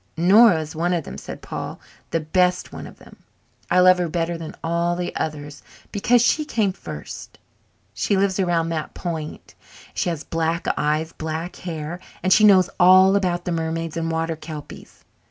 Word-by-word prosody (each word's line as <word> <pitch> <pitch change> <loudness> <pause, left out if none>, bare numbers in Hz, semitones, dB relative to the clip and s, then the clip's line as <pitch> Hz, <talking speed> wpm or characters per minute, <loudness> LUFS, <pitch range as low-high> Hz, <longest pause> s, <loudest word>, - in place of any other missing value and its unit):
"Nora 190 +2 +6
is 155 0 -7
one 175 +3 0
of 170 -3 -1
them," - - -8
said - - -9
Paul, - - -6 0.3
"the 165 - 0
best 180 +3 +1
one - - -7
of - - -14
them. - - -16 0.5
I - - +4
love 185 0 +6
her 175 -2 -1
better 170 +1 -1
than 165 -1 -7
all 170 +1 0
the 175 0 -4
others 150 -2 -5 0.3
because 235 +4 +3
she 305 +5 +2
came 220 -9 0
first. - - -9 0.6
She 200 - 0
lives 195 0 +1
around 170 -3 +1
that 160 -2 -4
point 160 -3 -6 0.4
and - - -22
she - - +1
has 160 -3 -4
black 165 +1 -2
eyes 155 +2 0
and - - -31
black 160 +2 -4
hair 165 -1 -5 0.2
and 185 +1 +4
she 215 - +5
knows 190 -4 +7
all 185 +2 +7
about 180 -3 0
the 180 - -2
mermaids 165 0 -3
and 165 0 -2
water 165 0 -1
kelpies. 155 -2 -10
170 Hz, 185 wpm, -22 LUFS, 160-185 Hz, 0.6 s, knows